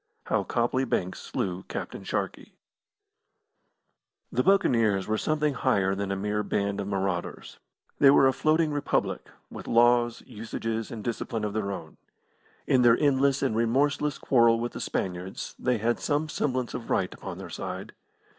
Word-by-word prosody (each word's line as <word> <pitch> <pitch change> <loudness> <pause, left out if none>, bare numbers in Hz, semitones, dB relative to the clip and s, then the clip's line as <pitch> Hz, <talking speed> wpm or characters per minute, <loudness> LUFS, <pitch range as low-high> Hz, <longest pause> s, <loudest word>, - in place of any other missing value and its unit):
III - - -13
HOW - - -1
COPLEY 120 +2 0
BANKS 95 -7 -2
SLEW 90 -1 -3
CAPTAIN - - -6
SHARKEY - - -4 1.8
The - - +1
Buccaneers 115 - +3
were 110 0 -1
something 150 -1 0
higher 100 -8 +1
than 100 0 -3
a - - 0
mere 105 +2 -1
band 100 0 -1
of 100 - -5
marauders. 95 -3 -3 0.4
They 140 - +7
were 135 -1 +6
a 130 - +4
floating 155 +3 +2
republic, 145 0 -1 0.2
with - - -9
laws, 120 0 +3
usages, 115 -1 -4
and 110 -3 -7
discipline 115 -1 -3
of 105 -1 -2
their 105 -2 -2
own. 80 -5 -8 0.7
In 130 - +3
their 120 -1 +6
endless 140 -1 +2
and 130 -5 +1
remorseless 140 +5 +1
quarrel 115 -3 +4
with 120 +1 -2
the - - -7
Spaniards 90 0 -4
they 125 -1 +1
had 115 +2 0
some 150 +1 0
semblance 130 -4 -1
of 120 -2 -6
right 90 - 0
upon - - -8
their - - -8
side. - - -6
115 Hz, 160 wpm, -27 LUFS, 100-135 Hz, 1.8 s, They